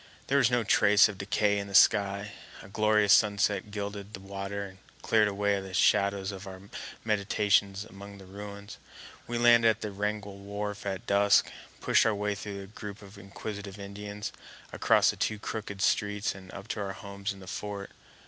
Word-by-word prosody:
There 140 +1 +2
was 120 - +4
no 120 -1 +1
trace 105 0 +5
of 105 -3 -8
decay 100 +1 +1
in 100 - -5
the 100 - -5
sky; 100 0 +4 0.3
a - - -11
glorious 105 0 +3
sunset 105 -1 +2
gilded 100 0 -5
the - - -10
water 100 +1 -5
and 95 -1 -12 0.2
cleared 110 -2 +4
away 100 0 0
the 95 -1 -7
shadows 100 0 +2
of 95 0 -9
our 95 -1 -8 0.5
meditations 100 -1 +1
among 100 0 -11
the 95 - -13
ruins. 100 +1 -9 0.5
We 120 - -2
landed 120 -1 +6
at 110 0 0
the 105 - -4
Wrangell 100 0 -3
wharf 100 +1 -5
at 95 -2 -4
dusk, 100 0 +4 0.3
pushed - - +4
our 110 - +1
way 105 0 -1
through 100 -1 -6
a - - -9
group 105 0 -9
of 100 0 -13
inquisitive 100 0 -7
Indians, 100 +1 -6 0.4
across - - +4
the - - -12
two 110 - -1
crooked 100 -2 -5
streets, 105 0 +1
and 95 -1 -12
up 100 +1 -9
to - - -3
our 100 -1 -3
homes 100 +1 -5
in 100 - -10
the 95 - -11
fort. 100 +1 -6
100 Hz, 185 wpm, -29 LUFS, 100-105 Hz, 0.5 s, landed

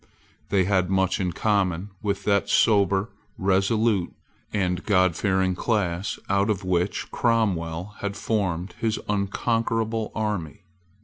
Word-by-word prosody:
They 100 -2 +3
had 95 -1 +1
much 95 -1 +1
in 90 -2 0
common 100 -1 0
with 100 -2 -2
that 100 -1 +1
sober, 100 -1 +3 0.3
resolute, 100 0 +2 0.4
and 90 -3 -1
Godfearing 95 -1 +2
class 95 -3 -1
out 100 +2 +2
of 100 -2 -1
which 90 +1 -1
Cromwell 95 -6 0
had 100 0 -3
formed 95 -4 -1
his 110 -1 0
unconquerable 110 +2 -1
army. 105 -8 -3
100 Hz, 115 wpm, -25 LUFS, 90-105 Hz, 0.4 s, They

